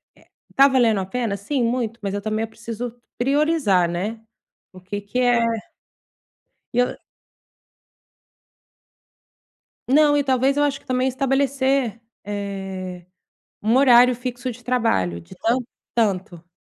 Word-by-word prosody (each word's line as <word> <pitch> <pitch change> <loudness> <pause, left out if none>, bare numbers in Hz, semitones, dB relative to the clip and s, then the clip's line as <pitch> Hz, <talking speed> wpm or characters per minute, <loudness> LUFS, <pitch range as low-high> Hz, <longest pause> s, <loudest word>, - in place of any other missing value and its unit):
eh - - -23
eh, - - -26 0.3
tá 275 +1 +7
valendo 235 -6 +3
a 190 - -2
pena? 230 0 -2
Sim, 250 +6 -1
muito, 235 -1 -1
mas 200 -2 -3
eu 205 - -2
também 215 +2 -2
preciso 230 +1 -6 0.2
priorizar, 275 - +2
né? 205 +6 -3 0.5
O 185 - -13
que 205 +2 -5
que 205 +5 -3
é 245 -2 +3 1.3
e - - -1
eu 245 - +1 2.9
Não, 295 +1 +5
e - - +2
talvez 265 +1 +2
eu 290 - +3
acho 280 -1 0
que - - -27
também 255 0 +1
estabelecer, 270 -2 0 0.2
eh, 195 -3 -5 0.6
um 225 +3 +2
horário 250 -2 +6
fixo 250 +1 -4
de 245 +1 -11
trabalho, 225 - 0
de 85 - -14
tanto 245 +3 +2 0.4
a - - +6
tanto. 185 -5 -2
235 Hz, 135 wpm, -22 LUFS, 200-260 Hz, 2.9 s, tá